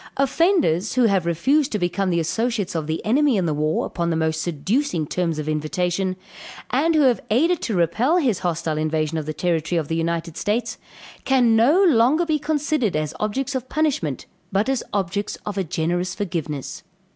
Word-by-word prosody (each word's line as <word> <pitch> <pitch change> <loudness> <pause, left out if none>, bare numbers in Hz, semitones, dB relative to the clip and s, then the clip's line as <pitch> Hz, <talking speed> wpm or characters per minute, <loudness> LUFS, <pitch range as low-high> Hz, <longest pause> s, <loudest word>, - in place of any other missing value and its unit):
Offenders, 275 - +2
who 255 - +4
have 195 -6 +2
refused 270 - +2
to 210 - 0
become 185 +1 -1
the 170 -1 +1
associates 220 +4 -1
of 160 -3 -3
the 160 +1 -3
enemy 265 +2 +3
in 185 - +1
the 155 - 0
war, 155 +1 0
upon 170 -1 -2
the 165 - 0
most 160 0 0
seducing 175 - -1
terms 165 0 -2
of 155 0 -4
invitation; 175 +5 -1 0.6
and 315 +6 +2
who 310 - +4
have 255 -3 +3
aided 320 +10 +2
to 220 - -2
repel 210 - +2
his 250 - +1
hostile 165 -3 -2
invasion 155 0 -1
of 155 - -7
the - - -1
territory 170 0 0
of 155 -3 -2
the 165 - -1
United 165 0 -2
States, 220 +1 -2 0.4
can 245 -4 +3
no 285 - +4
longer 300 +1 +4
be 310 -2 0
considered 295 - 0
as 155 -1 -2
objects 255 +6 -2
of 260 -1 -4
punishment, 275 - -1 0.3
but 200 +4 +1
as 270 -3 0
objects 200 +1 -2
of 210 - -4
a 195 - 0
generous 175 +2 -2
forgiveness. 160 -8 -4
190 Hz, 185 wpm, -22 LUFS, 165-260 Hz, 0.6 s, who